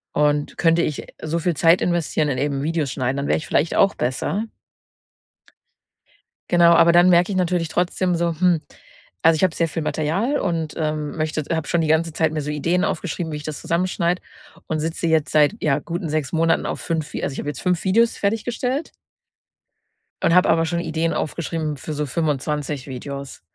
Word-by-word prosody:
Und 145 Hz, 0 st, +1 dB
könnte, 165 Hz, 0 st, +3 dB
äh, -, -, +2 dB
ich 150 Hz, -, -4 dB
so 160 Hz, +2 st, -2 dB
viel 170 Hz, -1 st, 0 dB
Zeit 170 Hz, +2 st, +5 dB
investieren 165 Hz, -3 st, 0 dB
in 130 Hz, -, -1 dB
eben 140 Hz, 0 st, -1 dB
Videos 155 Hz, -3 st, -1 dB
schneiden, 130 Hz, 0 st, -2 dB
dann 140 Hz, -, -2 dB
wäre -, -, +2 dB
ich 155 Hz, -, -6 dB
vielleicht 160 Hz, -, +1 dB
auch 195 Hz, -, +4 dB
besser. 160 Hz, -, -2 dB, 2.0 s
Genau, 170 Hz, -1 st, +6 dB
aber 170 Hz, 0 st, +6 dB
dann 175 Hz, +1 st, +6 dB
merke 175 Hz, +3 st, +4 dB
ich 190 Hz, -, -1 dB
natürlich 175 Hz, -2 st, +1 dB
trotzdem 180 Hz, +1 st, 0 dB
so, 170 Hz, -1 st, 0 dB
hm, 175 Hz, -4 st, +3 dB, 0.6 s
also, 165 Hz, 0 st, +5 dB
ich -, -, -1 dB
habe 180 Hz, -3 st, +2 dB
sehr 165 Hz, -, +1 dB
viel 160 Hz, +1 st, -4 dB
Material 185 Hz, -, 0 dB
und, 165 Hz, -4 st, -2 dB
ähm, 155 Hz, 0 st, -2 dB
möchtet 155 Hz, 0 st, -2 dB
habe 160 Hz, -3 st, -1 dB
schon 170 Hz, -1 st, +1 dB
die 160 Hz, -, 0 dB
ganze 160 Hz, +1 st, +1 dB
Zeit 160 Hz, -1 st, +1 dB
mir 155 Hz, -, -2 dB
so 150 Hz, +1 st, -4 dB
Ideen 170 Hz, +5 st, 0 dB
aufgeschrieben, 170 Hz, -2 st, -2 dB
wie -, -, -3 dB
ich 150 Hz, -, -9 dB
das 155 Hz, -2 st, -5 dB
zusammenschneide 175 Hz, 0 st, 0 dB, 0.5 s
und 155 Hz, -2 st, -1 dB
sitze 165 Hz, +2 st, -2 dB
jetzt 160 Hz, -2 st, +1 dB
seit 150 Hz, +6 st, +4 dB
ja 145 Hz, -3 st, +2 dB
guten 170 Hz, -1 st, -4 dB
6 155 Hz, -3 st, -1 dB
Monaten 165 Hz, 0 st, +1 dB
auf -, -, -3 dB
5 160 Hz, -2 st, -3 dB
Vi -, -, -4 dB
also, 140 Hz, -, -2 dB
ich -, -, -6 dB
habe 145 Hz, -, -3 dB
jetzt 135 Hz, -, -6 dB
5 180 Hz, -3 st, +1 dB
Videos 225 Hz, +5 st, +2 dB
fertiggestellt 240 Hz, +7 st, -2 dB, 1.3 s
und 165 Hz, -, +3 dB
habe 180 Hz, -, +5 dB
aber 165 Hz, 0 st, +3 dB
schon 170 Hz, +1 st, -1 dB
Ideen 165 Hz, 0 st, -1 dB
aufgeschrieben 155 Hz, -2 st, -3 dB
für 155 Hz, +3 st, -6 dB
so 150 Hz, 0 st, -2 dB
25 150 Hz, -1 st, -2 dB
Videos. 140 Hz, +1 st, -7 dB
165 Hz, 195 wpm, -22 LUFS, 150-175 Hz, 2.0 s, Genau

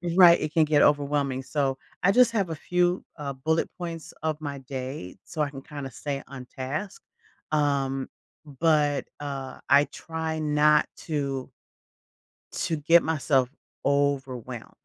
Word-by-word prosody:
Right, 175 Hz, -2 st, +8 dB
it 155 Hz, 0 st, -3 dB
can 160 Hz, -2 st, +5 dB
get 150 Hz, -1 st, +4 dB
overwhelming. 140 Hz, -2 st, +2 dB
So, 135 Hz, -1 st, -1 dB, 0.3 s
I 195 Hz, -, +6 dB
just 245 Hz, +2 st, +6 dB
have 200 Hz, -6 st, 0 dB
a -, -, -2 dB
few, 180 Hz, +3 st, +1 dB
uh, 140 Hz, -2 st, -4 dB
bullet 160 Hz, +5 st, 0 dB
points 165 Hz, -2 st, -6 dB
of 155 Hz, -1 st, -1 dB
my 140 Hz, -2 st, -5 dB
day, 130 Hz, -7 st, -6 dB
so 155 Hz, -3 st, -4 dB
I 145 Hz, -, +1 dB
can 135 Hz, -1 st, -9 dB
kinda 145 Hz, -2 st, -7 dB
stay 140 Hz, +2 st, -4 dB
on 130 Hz, -2 st, -9 dB
task, 140 Hz, +11 st, -5 dB, 0.5 s
um, 140 Hz, -3 st, +1 dB, 0.4 s
but, 150 Hz, 0 st, +1 dB
uh, 140 Hz, -2 st, -5 dB
I 140 Hz, +1 st, +6 dB
try 160 Hz, -1 st, -4 dB
not 150 Hz, 0 st, +4 dB, 0.2 s
to 140 Hz, -4 st, -2 dB, 1.0 s
to 160 Hz, -, -1 dB
get 165 Hz, +3 st, +5 dB
myself 140 Hz, -5 st, +2 dB, 0.4 s
overwhelmed. 135 Hz, -4 st, -1 dB
145 Hz, 140 wpm, -26 LUFS, 135-160 Hz, 1.0 s, Right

